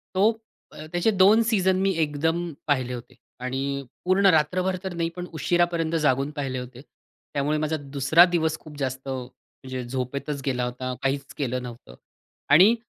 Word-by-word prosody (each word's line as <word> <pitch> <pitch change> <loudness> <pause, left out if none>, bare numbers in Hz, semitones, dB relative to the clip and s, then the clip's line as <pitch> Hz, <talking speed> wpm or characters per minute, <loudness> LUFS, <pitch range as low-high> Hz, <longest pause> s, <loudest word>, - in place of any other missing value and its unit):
तो 205 +4 +5 0.4
अ, 155 - -9
त्याचे 175 +6 +2
2 200 +3 +6
सीझन 190 -4 +2
मी 195 0 +2
एकदम 160 +3 0 0.2
पाहिले 130 -3 +1
होते 120 +1 -9 0.2
आणि 135 +2 -2 0.2
पूर्ण 190 +2 +3
रात्रभर 180 +5 +2
तर 190 -2 -4
नाही, 165 -1 -1
पण 180 - -5
उशिरापर्यंत 165 +1 +1
जागून 135 -1 +2
पाहिले 135 -3 -2
होते. 125 0 -9 0.5
त्यामुळे 145 +2 0
माझा 155 +1 -1 0.2
दुसरा 150 +6 +6
दिवस 160 -3 0
खूप 150 -2 -12
जास्त 130 0 -3
म्हणजे 130 0 -7
झोपेतच 135 +3 -3
गेला 125 -2 0
होता. 125 +1 -4
काहीच 135 0 -1
केलं 125 -2 -2
नव्हतं. 120 - -10 0.5
आणि 185 +10 +7
145 Hz, 155 wpm, -25 LUFS, 130-175 Hz, 0.5 s, आणि